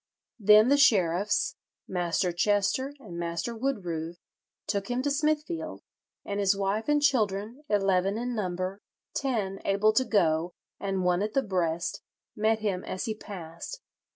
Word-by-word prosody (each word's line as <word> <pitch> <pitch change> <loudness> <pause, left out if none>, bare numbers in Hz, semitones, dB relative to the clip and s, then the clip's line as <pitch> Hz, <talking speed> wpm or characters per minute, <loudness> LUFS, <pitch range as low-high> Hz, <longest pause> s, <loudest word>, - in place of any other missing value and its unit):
"Then 215 +3 +7
the 285 - +5
sheriffs, 200 -7 +3 0.3
Master 180 0 0
Chester 205 +9 +1
and 180 -10 -8
Master 170 +7 -3
Woodroove, 175 -10 -3 0.5
took 200 +2 -2
him 245 +1 -1
to 285 - +1
Smithfield; 305 +3 -1 0.4
and 200 0 -3
his 200 0 +3
wife 200 +5 -1
and 295 -1 +3
children, 225 -2 +1
eleven 195 -1 +2
in 245 +1 -2
number, 185 -1 -3 0.3
ten 210 -8 -1
able 200 +2 +3
to 260 - +3
go, 170 -7 +1 0.3
and 195 -2 -1
one 180 +1 +2
at 210 +1 -2
the 270 - +3
breast, 170 -3 -1 0.3
met 220 +1 +1
him 195 -4 -1
as 185 - -4
he 220 - -1
passed. 190 - -8
200 Hz, 145 wpm, -28 LUFS, 180-235 Hz, 0.5 s, Then